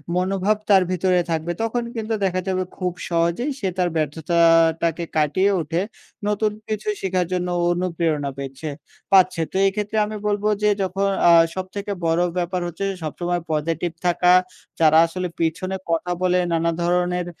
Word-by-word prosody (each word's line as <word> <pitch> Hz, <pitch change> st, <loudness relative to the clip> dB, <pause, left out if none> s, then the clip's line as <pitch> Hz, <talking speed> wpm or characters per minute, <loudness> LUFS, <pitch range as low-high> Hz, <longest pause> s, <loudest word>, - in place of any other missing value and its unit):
মনোভাব 190 Hz, +3 st, +1 dB
তার 195 Hz, -2 st, +6 dB
ভিতরে 185 Hz, 0 st, +2 dB
থাকবে 165 Hz, +1 st, -1 dB
তখন 235 Hz, +1 st, -1 dB
কিন্তু 225 Hz, 0 st, -3 dB
দেখা 185 Hz, -1 st, 0 dB
যাবে 185 Hz, -1 st, 0 dB
খুব 180 Hz, -2 st, -2 dB, 0.2 s
সহজেই 170 Hz, -, 0 dB
সে 195 Hz, -, -1 dB
তার 180 Hz, -1 st, +2 dB
ব্যর্থতাটাকে 165 Hz, +2 st, +2 dB
কাটিয়ে 155 Hz, +7 st, +2 dB
উঠে 165 Hz, +3 st, -1 dB, 0.5 s
নতুন 210 Hz, +1 st, +1 dB, 0.2 s
কিছু 215 Hz, -1 st, -3 dB
শেখার 185 Hz, -2 st, 0 dB
জন্য 180 Hz, 0 st, -1 dB, 0.2 s
অনুপ্রেরণা 165 Hz, -5 st, -1 dB
পেচ্ছে 135 Hz, +3 st, -6 dB, 0.4 s
পাচ্ছে। 185 Hz, -3 st, +5 dB
তো -, -, -2 dB
এক্ষেত্রে 210 Hz, +2 st, -2 dB
আমি 215 Hz, +1 st, -6 dB
বলব 205 Hz, 0 st, -1 dB, 0.2 s
যে 210 Hz, -, +5 dB
যখন 195 Hz, +1 st, -1 dB, 0.2 s
আ -, -, +8 dB, 0.2 s
সবথেকে 195 Hz, +2 st, -5 dB
বড়ো 165 Hz, +2 st, +2 dB
ব্যাপার 180 Hz, +1 st, -1 dB
হচ্ছে 175 Hz, +3 st, -4 dB, 0.2 s
সবসময় 175 Hz, +3 st, -2 dB
পজিটিভ 165 Hz, +2 st, -1 dB
থাকা। 180 Hz, 0 st, +4 dB, 0.5 s
যারা 160 Hz, -1 st, +5 dB
আসলে 180 Hz, +2 st, -4 dB
পিছনে 170 Hz, +3 st, -1 dB, 0.2 s
কথা 165 Hz, +2 st, 0 dB
বলে 180 Hz, 0 st, +2 dB
নানা 165 Hz, 0 st, +1 dB
ধরনের 180 Hz, 0 st, 0 dB
180 Hz, 150 wpm, -22 LUFS, 165-190 Hz, 0.5 s, আ